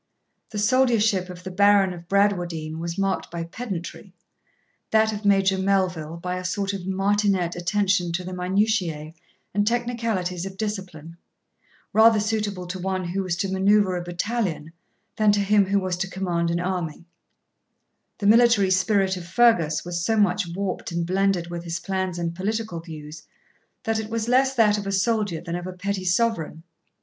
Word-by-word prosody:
The 215 - -7
soldiership 215 -4 +2
of 180 0 -9
the 185 - -6
Baron 200 0 +4
of 170 -1 -11
Bradwardine 175 -6 0
was 170 0 -4
marked 195 -1 -1
by 170 0 -4
pedantry; 185 0 -7 0.7
that 220 0 +3
of 210 0 -6
Major 195 -1 +3
Melville 185 -5 0
by 180 +1 -4
a 185 - -5
sort 195 +2 -2
of 190 -2 -6
martinet 195 -2 +1
attention 185 0 +1
to 180 +1 -2
the 185 +1 -6
minutiae 180 -4 0 0.4
and 205 +1 +1
technicalities 230 -7 -1
of 190 0 -10
discipline, 185 -7 -5 0.8
rather 220 0 +6
suitable 210 -3 -2
to 180 +1 -6
one 185 0 -2
who 195 +3 -1
was 185 -3 -2
to 190 +2 -2
manoeuvre 195 0 +3
a 175 - -3
battalion 175 -3 -3 0.4
than 215 -1 +4
to 205 - +1
him 200 0 +3
who 200 +1 +2
was 185 -2 -2
to 190 +1 -3
command 175 -3 -1
an 170 0 0
army; 175 -3 -3 1.1
the 205 - -4
military 220 -3 +5
spirit 190 +1 +2
of 175 -1 -8
Fergus 175 -8 +3
was 175 -1 -3
so 225 +3 +1
much 200 -2 +2
warped 195 -2 -3
and 170 0 -1
blended 185 -1 0
with 170 -1 -5
his 170 0 -4
plans 190 -2 -2
and 170 -1 -2
political 205 0 -3
views, 155 -2 -9 0.6
that 225 0 0
it 220 -1 -5
was 225 0 -2
less 265 +2 +3
that 210 -3 +4
of 200 - -6
a - - -1
soldier 200 -3 0
than 170 -1 -5
of 175 +1 -5
a 185 - -6
petty 190 +1 -3
sovereign. 180 -4 0
190 Hz, 170 wpm, -24 LUFS, 175-205 Hz, 1.1 s, rather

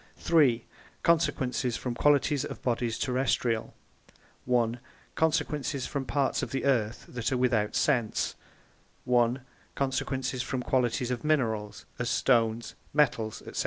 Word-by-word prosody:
3) 135 -9 +3 0.4
Consequences 130 -7 +1
from 125 - -3
Qualities 145 +2 +3
of - - -6
Bodies 120 -2 0
Terrestrial 125 -3 0 0.8
a) 120 -2 +3 0.4
Consequences 150 -4 0
from 140 -1 -3
parts 140 0 0
of - - -3
the 135 - -2
Earth 120 -5 +1
that 125 -1 -3
are 130 - +1
without 120 -4 +1
Sense, 115 -3 +1 0.7
1] 120 +1 +2 0.3
Consequences 130 -1 -1
from 130 -1 -3
Qualities 125 -1 0
of 125 - -3
Minerals, 110 -9 0
as 120 -1 -1
Stones, 115 -2 +2 0.2
Metals, 115 -7 +1
&c - - -3
125 Hz, 125 wpm, -28 LUFS, 115-135 Hz, 0.8 s, 3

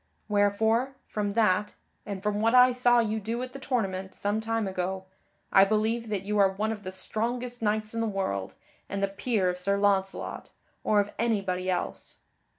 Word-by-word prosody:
Wherefore, 220 +5 +2
from 205 -1 -2
that, 210 -2 +2 0.3
and 200 -2 -5
from 210 0 0
what 230 +2 +3
I 250 0 +8
saw 245 -1 +3
you 220 -2 +1
do 225 +3 -3
at 255 0 -7
the 275 - -7
tournament, 195 -8 -2
some 205 +2 -1
time 225 -1 -1
ago, 190 0 -3 0.5
I 195 - +8
believe 220 +3 0
that 200 -3 -2
you 210 +1 -1
are 195 -1 +6
one 210 +3 -2
of 215 -2 -5
the 185 - -6
strongest 240 +5 -3
knights 215 0 0
in 230 - -1
the 225 - 0
world, 190 - -2 0.3
and 200 0 -2
the - - +3
peer 195 0 0
of 180 0 -1
Sir 200 +2 +1
Launcelot, 195 -1 -1 0.3
or 210 -1 +4
of 205 +1 -5
anybody 195 -5 0
else. 180 -1 -3
210 Hz, 185 wpm, -28 LUFS, 195-225 Hz, 0.5 s, I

